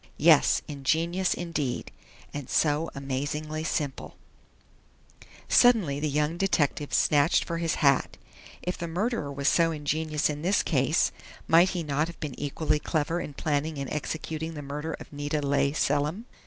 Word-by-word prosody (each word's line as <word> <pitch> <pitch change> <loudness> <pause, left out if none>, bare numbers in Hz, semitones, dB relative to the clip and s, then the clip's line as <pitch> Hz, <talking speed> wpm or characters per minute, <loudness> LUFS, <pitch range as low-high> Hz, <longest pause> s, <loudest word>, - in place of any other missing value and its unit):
Yes, - - +5
ingenious 165 +6 0
indeed! 155 -7 -3 0.4
And 145 -3 -6
so 155 +1 +2
amazingly 145 +3 -3
simple 145 -4 -3 1.3
Suddenly 210 - +4
the 150 +1 -1
young 150 +3 0
detective 150 -6 0
snatched 145 +1 +3
for 170 -1 -3
his 165 -2 0
hat. 140 -1 +3 0.5
If 180 - -3
the 170 - -3
murderer 180 - -2
was 140 0 -2
so 165 -1 +4
ingenious 155 0 -1
in 150 -1 -4
this 190 +5 +2
case, 145 +1 +2 0.4
might 170 +3 +6
he 180 -3 -3
not 150 +1 0
have 170 - -10
been 150 -4 -4
equally 150 +1 0
clever 165 +2 -1
in 145 - -7
planning 150 +1 -1
and 140 -1 -4
executing 160 +1 -4
the 145 - -6
murder 150 +3 -4
of - - -12
Nita 145 +1 -2
Leigh 140 -1 +1
Selim? 150 +8 0
150 Hz, 150 wpm, -27 LUFS, 145-165 Hz, 1.3 s, might